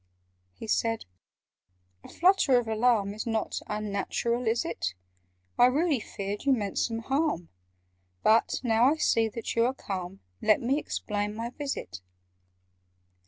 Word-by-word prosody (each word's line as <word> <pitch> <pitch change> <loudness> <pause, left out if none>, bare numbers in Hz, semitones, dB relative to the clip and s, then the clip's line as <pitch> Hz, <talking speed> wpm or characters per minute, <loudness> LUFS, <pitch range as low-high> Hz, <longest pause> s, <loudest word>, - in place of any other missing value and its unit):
He - - -8
said 225 +1 0 1.0
"A - - -12
flutter 355 -8 +4
of 240 -2 0
alarm 220 -2 +2
Is 215 +3 -5
not 225 -1 -1
unnatural, 215 +3 -2
is 225 +1 +1
it? 95 +1 -3 0.6
I 245 - +8
really 295 +2 +2
feared 200 -1 -5
you 275 - +4
meant 205 -6 -1
some 230 -1 -1
harm: 270 - 0 0.7
But, 225 +1 +3
now 230 -1 +3
I - - +1
see 225 -7 +2
that 230 +1 -5
you 230 - +4
are 260 - -2
calm, 190 -4 -6 0.2
Let 215 -1 +4
me 270 +5 +1
explain 210 -6 -3
my 230 +2 -4
visit. 280 - -5
225 Hz, 140 wpm, -28 LUFS, 210-250 Hz, 1.0 s, I